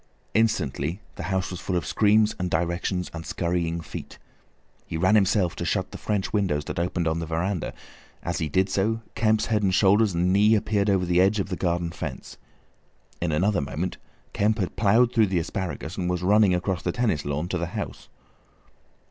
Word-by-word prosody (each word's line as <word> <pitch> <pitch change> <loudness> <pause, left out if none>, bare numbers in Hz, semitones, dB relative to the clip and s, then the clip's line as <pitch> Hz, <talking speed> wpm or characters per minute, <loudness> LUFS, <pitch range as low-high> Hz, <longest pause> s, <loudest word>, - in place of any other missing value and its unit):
Instantly 90 -6 0
the - - -8
house 95 0 -1
was 90 - -5
full 95 0 -3
of 85 - -1
screams 110 0 +3
and 90 0 -1
directions, 85 +2 -1
and 85 -1 -6
scurrying 85 -1 -1
feet. 80 - -8 0.7
He 80 - -3
ran 95 +5 +3
himself 100 -3 +3
to - - -3
shut - - -1
the - - -7
French 105 -2 -2
windows 90 -9 0
that - - -4
opened 85 -1 -1
on 80 +1 0
the 85 - -4
veranda; 85 +2 -2 0.5
as 85 +2 -2
he 80 -3 -1
did 95 +5 +2
so 105 +4 0
Kemp's 110 -1 +2
head 110 -2 +1
and 95 -2 +2
shoulders 100 +1 +4
and 90 +2 +2
knee 105 +3 +5
appeared 105 -1 +1
over 95 -2 +2
the 90 0 +3
edge 100 +3 +3
of 95 - -2
the 90 - -2
garden 85 -1 -1
fence. - - -7 0.8
In 85 -1 0
another 95 +4 +2
moment 80 +6 -3 0.4
Kemp 105 +2 +2
had 95 -5 -2
ploughed 115 +4 +3
through 110 -4 +4
the 95 -1 0
asparagus, 85 0 -4
and 90 -2 -1
was 90 0 -1
running 100 -1 +4
across 90 -1 -1
the - - -1
tennis 115 -12 0
lawn 75 +4 -2
to 90 - -1
the 85 - -2
house. - - -6
95 Hz, 195 wpm, -25 LUFS, 85-105 Hz, 0.8 s, knee